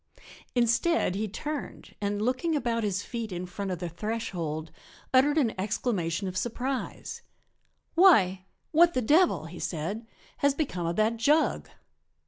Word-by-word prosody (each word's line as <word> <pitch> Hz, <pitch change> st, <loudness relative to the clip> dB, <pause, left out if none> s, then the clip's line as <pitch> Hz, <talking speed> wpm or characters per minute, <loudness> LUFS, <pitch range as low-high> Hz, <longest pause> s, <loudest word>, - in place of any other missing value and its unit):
Instead 240 Hz, -, +2 dB
he 210 Hz, +3 st, -2 dB
turned 295 Hz, +8 st, -6 dB
and, 205 Hz, +1 st, -1 dB
looking 260 Hz, +7 st, 0 dB
about 235 Hz, -5 st, 0 dB
his 200 Hz, -1 st, -1 dB
feet 230 Hz, -3 st, -5 dB
in 180 Hz, 0 st, -4 dB
front 195 Hz, +2 st, -5 dB
of 180 Hz, -, -2 dB
the 175 Hz, +1 st, -4 dB
threshold, 170 Hz, -5 st, -4 dB, 0.4 s
uttered 285 Hz, +4 st, +5 dB
an 245 Hz, -8 st, +2 dB
exclamation 195 Hz, -3 st, -1 dB
of 185 Hz, -, -5 dB
surprise. 245 Hz, +5 st, -3 dB, 0.7 s
"Why! 195 Hz, -, +5 dB, 0.3 s
what 340 Hz, +2 st, +5 dB
the 255 Hz, -, +1 dB
devil," 290 Hz, -, +4 dB
he 170 Hz, +2 st, -9 dB
said, 195 Hz, +8 st, -3 dB, 0.3 s
"has 280 Hz, -1 st, +2 dB
become 185 Hz, -, -2 dB
of 170 Hz, -, -1 dB
that 220 Hz, +2 st, +2 dB
jug?" 295 Hz, +8 st, +2 dB
220 Hz, 140 wpm, -28 LUFS, 185-270 Hz, 0.7 s, uttered